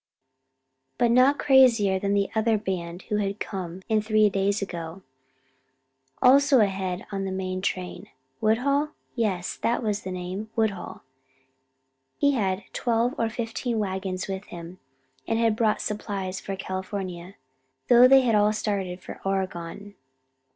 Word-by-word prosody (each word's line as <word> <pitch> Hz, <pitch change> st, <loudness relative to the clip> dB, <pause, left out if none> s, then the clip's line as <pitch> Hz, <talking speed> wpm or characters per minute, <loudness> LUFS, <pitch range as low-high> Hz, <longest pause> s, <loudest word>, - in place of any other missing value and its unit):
But 240 Hz, -1 st, +3 dB
not 255 Hz, +4 st, +5 dB
crazier 235 Hz, -8 st, +5 dB
than 200 Hz, +1 st, 0 dB
the 200 Hz, -1 st, +1 dB
other 220 Hz, 0 st, +2 dB
band 180 Hz, -4 st, -4 dB
who 210 Hz, -, -2 dB
had 200 Hz, 0 st, -2 dB
come 185 Hz, -2 st, -5 dB
in 215 Hz, -1 st, +2 dB
three 215 Hz, -1 st, +3 dB
days 200 Hz, +2 st, +1 dB
ago, 175 Hz, -1 st, -6 dB, 1.2 s
also 275 Hz, +1 st, +6 dB
ahead 190 Hz, -3 st, 0 dB
of 195 Hz, -1 st, -2 dB
the 195 Hz, -, -2 dB
main 185 Hz, 0 st, -3 dB
train. 185 Hz, -2 st, -4 dB, 0.3 s
Woodhull? 280 Hz, +7 st, +1 dB, 0.2 s
Yes, 195 Hz, -7 st, -1 dB
that 240 Hz, +1 st, 0 dB
was 210 Hz, -1 st, -1 dB
the 190 Hz, -, -6 dB
name 185 Hz, +4 st, -5 dB
Woodhull. 220 Hz, -5 st, -2 dB, 1.1 s
He 285 Hz, -, +3 dB
had 195 Hz, -6 st, -1 dB
twelve 235 Hz, +1 st, +1 dB
or 230 Hz, -, +1 dB
fifteen 230 Hz, +1 st, -3 dB
wagons 190 Hz, -2 st, -3 dB
with 195 Hz, +1 st, -5 dB
him, 170 Hz, +1 st, -10 dB, 0.5 s
and 225 Hz, -, +1 dB
had 225 Hz, -2 st, +2 dB
bought 220 Hz, -1 st, +1 dB
supplies 195 Hz, -3 st, -4 dB
for 195 Hz, -, -5 dB
California, 190 Hz, -1 st, -5 dB, 0.5 s
though 245 Hz, 0 st, +8 dB
they 265 Hz, -1 st, +6 dB
all 210 Hz, 0 st, +4 dB
had 215 Hz, -, 0 dB
started 195 Hz, -4 st, -2 dB
for -, -, -9 dB
Oregon. 195 Hz, 0 st, -3 dB
200 Hz, 140 wpm, -26 LUFS, 190-225 Hz, 1.2 s, though